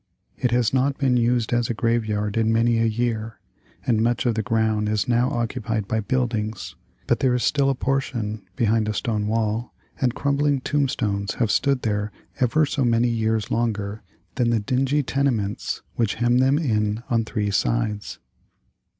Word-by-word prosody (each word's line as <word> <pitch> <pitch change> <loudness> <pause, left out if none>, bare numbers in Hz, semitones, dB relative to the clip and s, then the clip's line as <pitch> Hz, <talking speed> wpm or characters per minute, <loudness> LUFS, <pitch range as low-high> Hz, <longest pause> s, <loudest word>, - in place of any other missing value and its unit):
It 125 - 0
has 120 -1 +1
not 135 +1 +1
been 130 -3 +2
used 120 -1 +1
as 120 -1 +1
a 120 - -1
graveyard 110 -3 0
in 110 -1 +2
many 115 +1 +3
a 115 - +3
year, 115 -1 -2 0.5
and 115 -3 +2
much 115 -3 +1
of 120 - +3
the 110 - -1
ground 110 -2 0
is 105 -1 0
now 120 +1 +2
occupied 115 -4 -2
by 110 - 0
buildings. 110 -2 -2 0.3
But - - +1
there 130 -2 +2
is 125 - 0
still 140 -2 +2
a 135 - +1
portion, 120 -5 -2
behind 110 -1 +1
a 105 - -2
stone 105 -2 -1
wall, 110 +1 -1 0.3
and 125 -2 +1
crumbling 140 -1 +1
tombstones 115 -9 -1
have 115 -4 +1
stood 140 -2 +1
there 105 -1 -1 0.3
ever 140 +5 +3
so 140 -1 -1
many 120 0 +3
years 110 -2 0
longer 110 -3 -1 0.4
than 120 -3 +2
the 115 -1 +2
dingy 135 +6 +1
tenements 125 -8 -1
which 115 -4 +1
hem 120 +1 +2
them 135 +2 +4
in 110 -6 0
on 115 -1 +2
three 105 -2 -2
sides. 110 -1 -1
115 Hz, 170 wpm, -23 LUFS, 110-125 Hz, 0.5 s, them